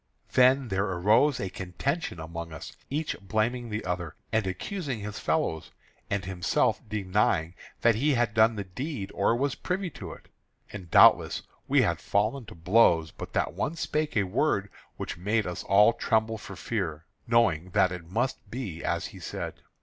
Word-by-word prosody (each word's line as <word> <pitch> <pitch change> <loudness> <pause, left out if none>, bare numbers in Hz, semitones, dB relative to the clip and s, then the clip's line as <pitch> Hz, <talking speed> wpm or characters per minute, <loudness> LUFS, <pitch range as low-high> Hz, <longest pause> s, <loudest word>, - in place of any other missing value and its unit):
Then 130 0 +4
there 95 0 +1
arose 105 +10 +3
a 95 - -3
contention 95 - -3
among 85 0 -6
us, 80 - -9
each 150 +3 -2
blaming 115 +4 -1
the 105 0 -4
other, 90 -3 -3 0.2
and 110 -3 +1
accusing 130 - -4
his 105 0 -5
fellows, 80 -1 -1 0.4
and 100 -3 -1
himself 90 -1 +1
denying 95 -5 +1 0.3
that 115 - +5
he 140 +6 +2
had 120 -3 +1
done 110 +1 +4
the 100 - -3
deed 105 - -5
or 115 - +2
was 135 +2 0
privy 185 -1 -3
to 90 -5 -8
it. - - -16 0.5
And 95 -5 -8
doubtless - - +6 0.2
we - - +4
had - - 0
fallen 110 +5 0
to 110 - -10
blows 85 -2 +4
but - - -9
that - - 0
one 155 - -2
spake 155 -4 -1
a 100 - +4
word 100 0 0 0.3
which - - -5
made 105 +4 0
us 90 - -4
all 105 +4 +6
tremble 110 -1 0
for 100 - -9
fear, 85 -4 -3 0.2
knowing 95 -8 +2
that 95 - +4
it 85 -2 -7
must 110 0 -2
be 100 -9 -5
as - - -1
he - - -10
said. - - -6
105 Hz, 175 wpm, -28 LUFS, 90-120 Hz, 0.5 s, doubtless